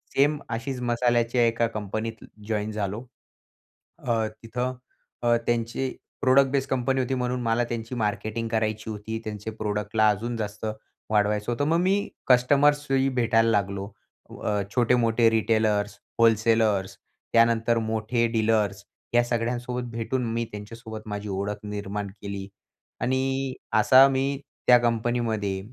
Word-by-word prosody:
Same 145 +2 +3
अशीच 125 +3 -3
मसाल्याच्या 120 0 +2
एका 115 0 +1
कंपनीत 110 +1 -5 0.2
जॉइन 110 -1 -1
झालो. 105 +3 -3 0.9
अ, 115 -2 0 0.2
तिथं 125 +2 -3 0.7
त्यांचे 120 +2 0
अ, - - -5 0.3
प्रोडक्ट 135 0 +5
बेस 135 0 0
कंपनी 130 +1 0
होती, 130 +1 0
म्हणून 125 0 -1
मला 115 +1 +1
त्यांची 115 +1 -4
मार्केटिंग 110 +1 -2
करायची 110 -1 -1
होती, 110 +1 -5
त्यांचे 105 0 -5
प्रोडक्टला 105 0 0
अजून 115 +4 -2
जास्त 105 0 -4 0.4
वाढवायचं 105 +1 +1
होतं. 120 +5 0
मग 165 +1 +3
मी 195 +3 +1 0.2
कस्टमर्सही 135 +1 +4
भेटायला 115 -1 +3
लागलो. 100 -2 -1 0.4
उ, - - -11
अ, 105 -1 0
छोटे-मोठे 120 -1 +3
रिटेलर्स, 110 -2 +1 0.2
होलसेलर्स, 110 -3 +3 0.4
त्यानंतर 115 0 +4
मोठे 110 +2 0
डीलर्स. 110 -3 +1 0.3
या 120 0 +5
सगळ्यांसोबत 120 +1 -2
भेटून, 115 +2 -2
मी 115 - 0
त्यांच्यासोबत 110 +1 -8
माझी 105 0 -4
ओळख 100 +2 -3
निर्माण 105 -1 -4
केली, 100 -1 -5 0.5
आणि 130 +1 0 0.3
असा 130 +1 +8
मी 135 +1 -1 0.3
त्या 125 -1 +8
कंपनीमध्ये 115 -4 0
115 Hz, 125 wpm, -26 LUFS, 105-125 Hz, 0.9 s, असा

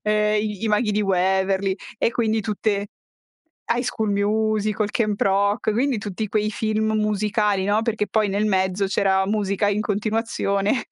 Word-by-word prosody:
ehm, 210 0 +2
i 210 -1 -4
i 225 - 0
Maghi 210 0 +1
di 210 - +1
Waverly, 190 0 +1 0.2
e 230 - +1
quindi 220 -2 0
tutte 205 -1 -1 0.9
High 240 +1 0
School 220 -4 -2
Musical, 215 0 0
Camp 210 -3 -1
Rock; 200 +3 +2
quindi 250 0 +1
tutti 205 +1 -4
quei 210 +1 0
film 220 0 -1
musicali, 210 -2 0
no, 210 +2 +1
perché 220 -2 -1
poi 215 -1 +1
nel 200 +2 0
mezzo 190 0 +1
c'era 190 -1 +1
musica 205 -1 0
in 205 +1 0
continuazione 215 +1 -1
210 Hz, 155 wpm, -22 LUFS, 200-215 Hz, 0.9 s, ehm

